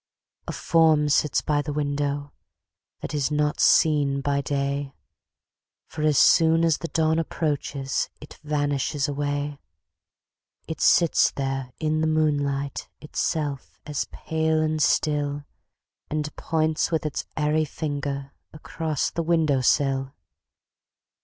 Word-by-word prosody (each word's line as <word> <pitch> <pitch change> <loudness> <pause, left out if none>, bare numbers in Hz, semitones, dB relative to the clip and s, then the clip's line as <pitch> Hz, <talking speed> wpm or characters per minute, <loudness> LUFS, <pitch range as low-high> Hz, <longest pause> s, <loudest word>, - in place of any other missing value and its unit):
A - - -2
form 160 -3 +3
sits 145 0 +2
by 145 -1 +1
the 150 - -4
window, 145 0 -2 0.7
That - - -5
is 145 -2 0
not 150 0 0
seen 145 -3 +4
by 140 0 0
day, 140 0 -2 0.9
For 155 - -7
as 150 -2 +3
soon 165 0 +5
as 160 -3 +2
the 165 - -4
dawn 160 0 +1
approaches 145 -4 -2
It 150 - -13
vanishes 145 -1 -1
away. 145 0 -2 1.1
It 160 - -5
sits 170 -2 +4
there 135 -2 -3
in 155 0 0
the 160 - +2
moonlight 145 -3 0
Itself 150 -2 -3
as 150 -1 -3
pale 160 0 0
and 155 0 0
still, 145 0 +1 0.7
And 150 0 -3
points 160 -1 0
with 160 -2 -1
its 150 - -3
airy 155 +1 +1
finger 140 -2 -4 0.2
Across 155 -1 -2
the 170 - -2
window 160 -5 +2
sill. 135 +1 +1
150 Hz, 120 wpm, -25 LUFS, 140-155 Hz, 1.1 s, soon